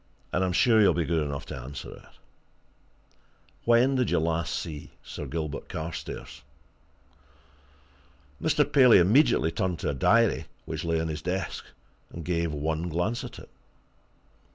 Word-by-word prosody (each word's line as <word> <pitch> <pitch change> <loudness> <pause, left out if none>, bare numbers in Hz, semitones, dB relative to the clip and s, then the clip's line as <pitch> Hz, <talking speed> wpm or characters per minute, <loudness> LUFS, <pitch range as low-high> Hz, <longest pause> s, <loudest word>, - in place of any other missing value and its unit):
"And 90 - +2
I'm 95 - 0
sure 110 +4 +4
you'll 100 - +5
be 85 - 0
good 80 -1 +1
enough 70 -1 -4
to - - -7
answer 65 +3 -8
it. - - -14 1.6
When 120 +3 +4
did 130 -2 +1
you - - +2
last 80 -1 0
see 75 -3 -6
Sir - - -7
Gilbert 75 -2 -4
Carstairs?" 80 -1 -6 2.0
Mr. 145 -1 +1
Paley 130 -4 +7
immediately 105 - +4
turned 90 +1 -1
to - - -2
a - - -1
diary 115 - +3 0.2
which - - -4
lay 85 -1 0
on 80 - -1
his 75 -1 -4
desk, 90 +3 -3 0.4
and 85 -2 -8
gave 85 -2 0
one 80 +3 -2
glance 90 +9 -1
at - - -8
it. - - -12
85 Hz, 150 wpm, -27 LUFS, 80-110 Hz, 2.0 s, Paley